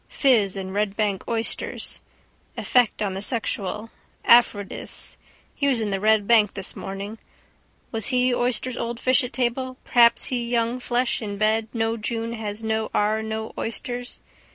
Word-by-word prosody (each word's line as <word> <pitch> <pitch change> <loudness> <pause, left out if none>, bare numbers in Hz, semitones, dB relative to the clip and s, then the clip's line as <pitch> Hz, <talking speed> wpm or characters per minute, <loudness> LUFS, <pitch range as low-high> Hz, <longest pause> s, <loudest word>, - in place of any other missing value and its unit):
Fizz 215 -8 +3
and 190 -1 -5
Red 205 0 -1
bank 205 -3 0
oysters. 230 -1 -3 0.6
Effect 245 -4 +2
on 195 -2 -1
the 190 - -4
sexual. 215 -1 -1 0.3
Aphrodis. 225 -4 +3 0.4
He 280 - -1
was 260 -4 +2
in 215 -2 -2
the 195 - -1
Red 215 0 +3
Bank 220 -4 +5
this 195 -1 -1
morning. 200 +3 -6 0.7
Was 225 -3 0
he 250 -1 +2
oysters 250 +1 -1
old 235 0 -3
fish 255 +2 +3
at 250 - -5
table 255 +1 -1
perhaps 235 -1 +5
he 245 -1 0
young 235 +1 0
flesh 245 0 0
in 205 -2 -4
bed 215 +1 +2
no 225 -1 -1
June 230 +1 -3
has 220 -1 -5
no 220 0 -1
ar 215 +1 +2
no 220 0 -4
oysters. 245 +2 -4
225 Hz, 155 wpm, -24 LUFS, 210-245 Hz, 0.7 s, Bank